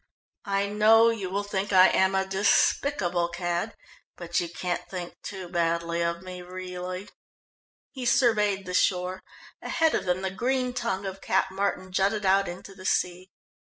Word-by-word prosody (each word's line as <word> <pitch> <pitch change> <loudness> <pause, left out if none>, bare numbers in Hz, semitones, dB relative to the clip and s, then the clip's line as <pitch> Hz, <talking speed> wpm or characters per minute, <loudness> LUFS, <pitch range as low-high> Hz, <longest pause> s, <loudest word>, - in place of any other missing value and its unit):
"I 195 0 +1
know 220 +3 +5
you 200 -5 -4
will 200 +2 -1
think 200 0 -3
I 185 -1 +8
am 190 0 +2
a 190 0 +1
despicable 190 -1 +2
cad, 175 +4 -3 0.4
but 175 0 -2
you 175 -2 -3
can't 175 0 -3
think 180 -2 -6
too 190 -3 -7
badly 170 -1 0
of 170 +1 -1
me, 180 -1 -8
really." 180 +1 -6 0.8
He 255 -3 -4
surveyed 210 -6 +2
the 180 - -5
shore. 185 0 +1 0.4
Ahead 320 -1 +1
of - - -1
them 180 +1 0
the 190 - -1
green 250 +5 -1
tongue 235 -6 -2
of 195 0 -6
Cap 190 0 +1
Martin 190 -1 -2
jutted 200 +2 +1
out 195 +1 +3
into 180 +3 -8
the 185 -1 -13
sea. 180 +1 -1
190 Hz, 160 wpm, -27 LUFS, 180-200 Hz, 0.8 s, I